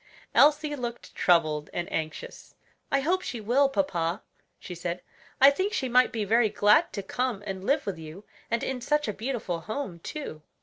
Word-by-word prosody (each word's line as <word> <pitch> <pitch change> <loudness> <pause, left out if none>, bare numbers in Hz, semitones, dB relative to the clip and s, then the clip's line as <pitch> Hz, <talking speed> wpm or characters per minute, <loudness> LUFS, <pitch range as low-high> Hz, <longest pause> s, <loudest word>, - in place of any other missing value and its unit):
Elsie 300 0 +4
looked 240 -3 -6
troubled 155 -4 +2
and 175 0 -2
anxious. 160 - -5 0.4
"I 275 - +3
hope 360 +6 +1
she 245 -9 -5
will, 250 +6 +3
papa," 180 - -1 0.3
she 180 - -8
said; 175 +1 -4 0.4
"I 275 +1 +9
think 380 +8 -1
she 265 - -1
might 250 +1 +4
be 220 -3 -2
very 220 +2 +3
glad 210 +11 +4
to 200 - -4
come 245 0 -2
and 190 -2 -5
live 280 +7 +1
with 190 -4 -4
you; 160 +6 -10 0.2
and 230 0 0
in 260 -2 -3
such 295 +3 +1
a 210 - -1
beautiful 220 -7 -3
home, 205 - -5
too." 165 - -7
230 Hz, 180 wpm, -27 LUFS, 180-275 Hz, 0.4 s, I